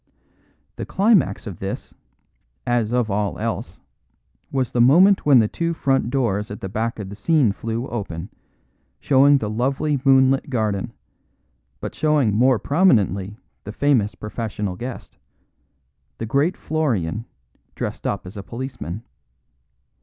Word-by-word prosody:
The - - -4
climax 195 - +2
of 100 -6 -7
this, 95 0 -5 0.7
as 120 -2 +1
of 120 -4 +1
all 100 -1 -1
else, - - -4 0.7
was 130 -3 -1
the 120 - +2
moment 175 +9 +5
when 140 -3 +7
the 110 -3 +5
two 170 +7 -2
front 135 -5 +1
doors 115 -6 0
at 105 - -7
the 95 - -5
back 115 +4 -2
of 105 -3 -6
the 100 - -8
scene 135 +1 +2
flew 115 +4 -4
open, 95 -6 -5 0.7
showing 140 +1 +5
the 110 - -3
lovely 135 +6 -1
moonlit 135 +1 +4
garden, 110 -6 -1 0.9
but - - -5
showing 150 -8 +2
more 125 +3 +4
prominently 105 - +2 0.3
the 105 - -6
famous 120 -4 +1
professional 105 -3 -4
guest; 125 +6 -8 1.0
the 115 - -4
great 140 - +1
Florian, 115 - -1 0.5
dressed - - -4
up - - -3
as 90 - -10
a 100 - -5
policeman. 115 -3 -6
120 Hz, 135 wpm, -22 LUFS, 105-140 Hz, 1.0 s, when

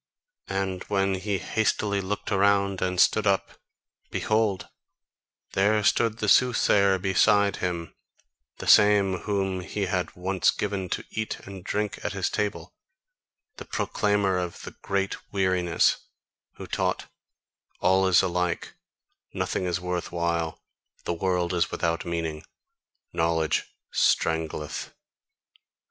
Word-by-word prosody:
And 95 -1 -2
when 95 -1 +1
he 95 +1 -1
hastily 100 +1 0
looked 100 +3 -4
around 100 -1 +2
and 90 -1 -1
stood - - +4
up, - - +1 0.6
behold, 110 -3 0 0.9
there 105 +2 +2
stood 115 +2 +2
the 105 - -2
soothsayer 100 -5 +4
beside 100 +2 +3
him, 85 -2 -3 0.6
the - - -7
same 100 -3 +5
whom 95 -2 0
he 100 +2 -3
had 90 -1 -2
once 95 +1 +1
given 100 -3 -2
to - - -2
eat 110 0 -3
and 95 -2 -10
drink 105 +2 -2
at - - -2
his - - -1
table, 105 -1 -3 0.8
the - - -8
proclaimer 100 -3 0
of 90 -1 -5
the - - -7
great 100 0 -3
weariness, 90 -3 +2 0.6
who - - -8
taught: - - -1 0.7
"All 95 +1 +3
is 90 -2 +5
alike, 90 -1 -1 0.6
nothing 95 - -1
is 90 -1 -1
worth 90 -1 -3
while, 85 -2 -2 0.4
the - - -2
world 90 0 0
is 85 -1 +1
without 85 0 -1
meaning, 80 -2 -3 0.7
knowledge 80 -1 +1 0.2
strangleth." 80 -2 0
95 Hz, 120 wpm, -26 LUFS, 90-100 Hz, 0.9 s, same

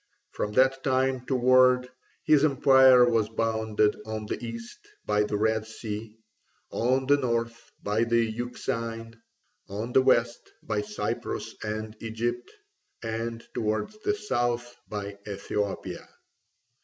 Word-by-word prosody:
From 105 - -3
that 135 +2 +3
time 130 -1 +1
forward 125 0 +4 0.3
his 150 -2 +4
empire 130 -3 +6
was 115 -3 +2
bounded 110 -1 +1
on 110 0 -5
the 105 - -5
east 115 0 -7 0.3
by 105 0 +2
the 105 0 0
Red 110 +1 +1
Sea, 110 0 -7 0.5
on 130 +3 +1
the 145 +2 +5
north 115 -3 -2
by 105 +3 +1
the 115 0 +3
Euxine, 115 0 -4 0.5
on 110 +5 -4
the 130 - +6
west 120 -2 +1
by 105 -1 -1
Cyprus 105 0 -4
and 110 0 -4
Egypt, 120 +2 -3 0.5
and 115 +1 -4
towards 110 - -2
the 415 - 0
south 120 - -1
by 100 -1 -5
Ethiopia. 100 0 -4
115 Hz, 120 wpm, -27 LUFS, 110-125 Hz, 0.5 s, empire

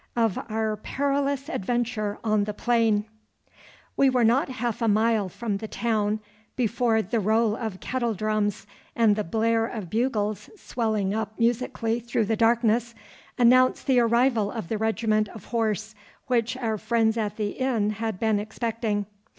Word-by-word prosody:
Of 225 -5 +1
our 220 -1 -1
Perilous 280 +3 -1
Adventure 230 - -2
on 215 -2 +2
the 210 0 -5
Plain 225 -3 +2 0.9
We 275 - +4
were 250 -2 +2
not 240 +5 +3
half 240 -3 -3
a 230 - +2
mile 215 -1 +2
from 210 +1 -3
the 220 - -6
town 215 -2 -1 0.3
before 230 -1 +1
the 230 +5 -1
roll 220 +1 +2
of 220 -5 -5
kettledrums 215 -5 -1 0.3
and 225 -3 +4
the 210 - -1
blare 225 +4 +1
of 210 -8 -7
bugles 215 -3 -1
swelling 220 - -1
up 220 0 -3
musically 235 -1 0
through 235 -1 -1
the 220 +2 0
darkness 235 0 +2 0.4
announced 255 +1 +4
the 260 -2 +4
arrival 235 -2 +3
of 220 -8 -6
the 220 - -2
regiment 220 -1 +1
of 225 - -11
horse 220 -2 -1 0.3
which 240 -2 0
our 225 -4 -2
friends 225 -1 +1
at 210 -3 -2
the 210 -2 -1
inn 235 -6 0
had 220 -2 -4
been 220 -2 +2
expecting. 220 -1 -2
225 Hz, 150 wpm, -25 LUFS, 215-235 Hz, 0.9 s, We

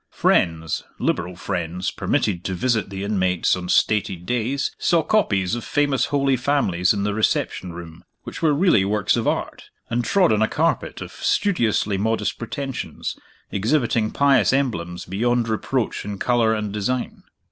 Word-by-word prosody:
Friends, 80 -2 +1
liberal 90 +1 -1
friends, 90 +1 -3
permitted 90 -4 -1
to 95 - -2
visit 115 -1 0
the 95 0 -5
inmates 95 -4 +1
on 90 -1 -6
stated 95 -5 +1
days, 125 +4 -1
saw 170 -2 +2
copies 105 - +1
of 120 -1 -2
famous 145 -4 +1
Holy 140 -2 +1
Families 120 -10 +1
in 100 -2 0
the 105 0 0
reception 100 -3 0
room 85 -1 -10 0.2
which - - -8
were 160 -2 +3
really 145 - +4
works 100 -1 +1
of - - -1
Art; - - -2 0.3
and 120 +1 +1
trod 180 +8 +3
on 105 - +1
a 110 - +4
carpet - - -1
of - - -7
studiously 115 - +1
modest 110 +2 -1
pretensions, 135 +2 -5 0.4
exhibiting 115 0 +1
pious 135 -7 +3
emblems 90 -11 -1
beyond 120 +5 0
reproach 115 +2 -1
in 100 0 -5
color 120 0 +2
and 105 -2 -2
design. 120 +5 -2
110 Hz, 155 wpm, -22 LUFS, 95-130 Hz, 0.4 s, really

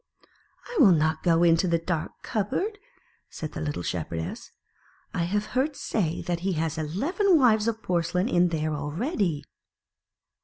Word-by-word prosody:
"I 485 - -4
will 210 - +8
not 160 0 +1
go 170 -1 +3
into 165 +2 +4
the 170 -1 +3
dark 165 -1 -4
cupboard," 310 - -2 0.5
said 155 - -6
the - - -6
little 145 - -3
Shepherdess; 80 -1 -4 0.6
"I 170 - 0
have 205 +4 -1
heard 275 +4 +1
say 175 - -2
that 175 -1 -2
he 190 +2 -1
has 160 0 -2
eleven 325 - +2
wives 225 -5 +4
of 225 -1 -2
porcelain 180 +2 0
in 175 -5 +3
there 155 -2 -1
already." 160 - -1
175 Hz, 150 wpm, -26 LUFS, 160-220 Hz, 0.6 s, will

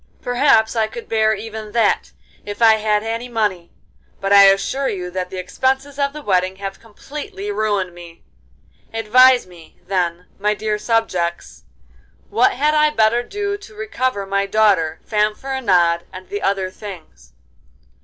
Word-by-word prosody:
Perhaps 245 -3 +3
I 220 -1 +1
could 235 +2 -9
bear 220 -1 +2
even 215 0 -8
that 230 -3 +1 0.3
if 205 0 -7
I 225 -2 +6
had 210 -1 0
any 230 +2 -4
money, 205 -7 -2 0.5
but 195 0 0
I 200 0 +9
assure 195 +8 +2
you 180 -2 -5
that 180 0 -4
the 190 - -7
expenses 265 +9 -2
of 280 0 +1
the 300 +1 -9
wedding 185 -3 +1
have 195 0 -7
completely 300 - -8
ruined 205 - -1
me. 170 -1 -13 0.7
Advise 250 +3 +5
me, 175 -3 -17
then, 180 -2 -1
my 210 +1 +1
dear 210 0 -2
subjects, 170 - -2 0.7
what 230 +4 +3
had 300 +3 +1
I 305 0 +4
better 225 -3 +2
do 405 +9 -3
to 415 +1 -15
recover 260 - -2
my 200 0 -1
daughter, 195 -7 +2
Fanfaronade, 210 -6 +1
and 185 0 -11
the 205 - -4
other 195 -1 -1
things. 165 - -11
215 Hz, 150 wpm, -19 LUFS, 185-245 Hz, 0.7 s, I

